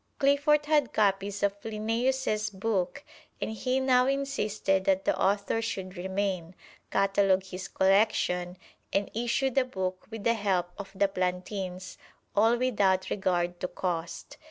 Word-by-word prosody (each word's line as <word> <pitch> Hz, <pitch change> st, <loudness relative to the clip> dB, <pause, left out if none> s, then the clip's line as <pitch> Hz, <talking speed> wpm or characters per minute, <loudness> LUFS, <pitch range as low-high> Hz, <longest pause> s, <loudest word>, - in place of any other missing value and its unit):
Cliffort 290 Hz, +2 st, +3 dB
had 295 Hz, -4 st, +2 dB
copies 200 Hz, -1 st, +1 dB
of 200 Hz, 0 st, 0 dB
Linnæus' 225 Hz, +1 st, -1 dB
book 200 Hz, +4 st, -2 dB, 0.4 s
and -, -, -3 dB
he 255 Hz, +4 st, 0 dB
now 255 Hz, -1 st, +4 dB
insisted 215 Hz, -8 st, 0 dB
that 190 Hz, 0 st, +2 dB
the -, -, +2 dB
author 200 Hz, +3 st, +1 dB
should 190 Hz, -5 st, -4 dB
remain, 190 Hz, -1 st, -2 dB, 0.3 s
catalog 195 Hz, -1 st, +2 dB
his 190 Hz, 0 st, -7 dB
collection 190 Hz, -2 st, +2 dB, 0.3 s
and 200 Hz, 0 st, 0 dB
issue 240 Hz, +4 st, 0 dB
the 270 Hz, +1 st, +3 dB
book 190 Hz, -7 st, -4 dB
with 225 Hz, -2 st, -7 dB
the 230 Hz, -, +3 dB
help 190 Hz, -5 st, 0 dB
of 200 Hz, -, -6 dB
the 200 Hz, +1 st, +3 dB
Plantins, 185 Hz, 0 st, -4 dB, 0.4 s
all 225 Hz, +3 st, +4 dB
without 200 Hz, -7 st, +1 dB
regard 175 Hz, -3 st, 0 dB
to -, -, -2 dB
cost. 170 Hz, -2 st, -4 dB
200 Hz, 135 wpm, -28 LUFS, 185-230 Hz, 0.4 s, now